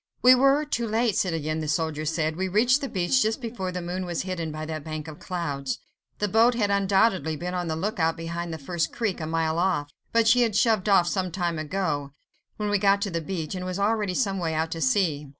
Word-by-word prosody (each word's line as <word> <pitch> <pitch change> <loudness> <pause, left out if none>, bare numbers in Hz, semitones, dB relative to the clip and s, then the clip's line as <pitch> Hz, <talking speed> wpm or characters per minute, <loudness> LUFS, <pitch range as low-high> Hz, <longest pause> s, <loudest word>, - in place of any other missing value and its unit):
"We 250 +1 +9
were 275 +3 +4
too 235 -5 -2
late, 225 -1 +1
citoyen," 160 -3 -1
the 155 - -3
soldier 155 0 -1
said, 155 0 0
"we 190 +2 -1
reached 240 +8 +3
the 275 - -3
beach 190 +7 +2
just 220 +3 +1
before 225 -7 -4
the 180 -1 -4
moon 180 +2 -3
was 175 -1 -2
hidden 175 -4 -3
by 155 0 -5
that 155 -2 -5
bank 155 0 -6
of 155 -2 -9
clouds. 145 -7 -3 0.4
The 210 - 0
boat 230 +4 +4
had 205 -4 +1
undoubtedly 195 -4 +2
been 180 +4 -4
on 180 -1 -2
the 160 - -1
look 195 +5 -3
out 165 0 +1
behind 170 +1 -4
that 160 -3 -7
first 170 +2 -1
creek, 215 -7 -2
a 155 - -3
mile 160 0 0
off, 175 -6 0 0.2
but 230 -1 +3
she 245 +2 +5
had 225 -4 +1
shoved 215 -2 +2
off 190 -3 +5
some 185 0 -1
time 170 -2 -2
ago, 150 -4 -2 0.4
when 210 -1 -2
we 205 - +2
got 200 0 +4
to 200 - -2
the 165 -1 -2
beach, 160 -1 -4
and 185 -1 -4
was 185 0 -3
already 205 -2 0
some 195 -6 0
way 165 -2 -1
out 160 +1 -1
to 165 - -4
sea. 165 - +1
180 Hz, 240 wpm, -26 LUFS, 160-210 Hz, 0.4 s, We